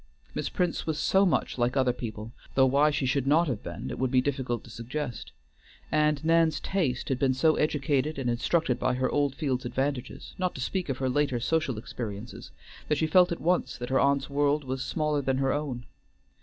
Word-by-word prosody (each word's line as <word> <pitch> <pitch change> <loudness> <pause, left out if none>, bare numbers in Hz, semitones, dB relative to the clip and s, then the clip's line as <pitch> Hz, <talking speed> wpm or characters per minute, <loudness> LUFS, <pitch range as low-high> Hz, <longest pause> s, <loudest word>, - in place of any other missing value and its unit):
Miss - - -2
Prince 180 -4 -1
was 155 -2 -1
so 195 +4 +3
much 160 - 0
like 120 +3 +1
other 130 -2 +3
people, 110 -2 -6 0.2
though 135 - +6
why 140 +3 +4
she 145 -2 -1
should 130 +1 0
not 160 +4 +4
have 120 -7 -2
been 85 0 -6
it - - -6
would 130 0 +1
be 130 0 +3
difficult 130 -3 -1
to 115 - -13
suggest, 120 +3 -5 0.6
and 150 0 +2
Nan's 165 -1 +3
taste 155 -11 -1
had 130 -2 0
been 130 -1 +2
so 155 +4 +3
educated 150 -1 0
and 135 -3 -2
instructed 125 +3 +1
by 125 - +1
her 130 0 0
Oldfields' 140 -2 0
advantages, 130 +1 -3
not 180 -1 -1
to - - -7
speak 185 +5 -2
of 135 - -1
her 130 - -1
later 130 -1 +1
social 155 -1 0
experiences, 110 0 -7 0.4
that 150 - +1
she 160 - +1
felt 180 +3 +5
at 170 - -2
once 175 +2 0
that 120 - -5
her 130 - +3
aunt's 140 0 +2
world 145 +1 +1
was 130 0 -3
smaller 150 -2 0
than 135 -1 0
her 135 0 +1
own. 135 -5 -3
135 Hz, 205 wpm, -28 LUFS, 125-150 Hz, 0.6 s, though